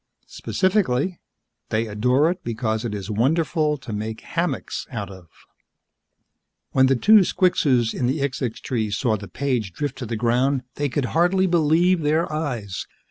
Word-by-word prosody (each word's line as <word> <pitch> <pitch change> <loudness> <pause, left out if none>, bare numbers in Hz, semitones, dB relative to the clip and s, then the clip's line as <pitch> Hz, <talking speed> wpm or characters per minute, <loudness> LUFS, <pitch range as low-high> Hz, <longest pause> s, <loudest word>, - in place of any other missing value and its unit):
Specifically, 185 -4 0 0.5
they 110 +1 0
adore 125 +9 +2
it 180 0 -7
because 110 -1 -2
it 110 -3 -3
is 100 +1 -5
wonderful 150 - +1
to 120 -5 -8
make 110 +1 -4
hammocks - - -3
out - - -5
of. 95 -3 -13 1.4
When 130 0 +4
the 135 - +3
two 215 - +6
squixes 140 - +2
in 125 - -1
the 135 +5 0
xixxix 130 -4 -2
tree 110 -5 -2
saw 110 +2 0
the 105 -1 -7
page 125 -8 -2
drift 140 +1 -4
to 125 - -5
the 115 - -3
ground, 125 +4 +1
they 145 -1 -2
could 135 +1 -1
hardly 180 +3 +3
believe 170 +1 +3
their 155 +3 +2
eyes. 120 -11 -3
130 Hz, 155 wpm, -23 LUFS, 110-160 Hz, 1.4 s, two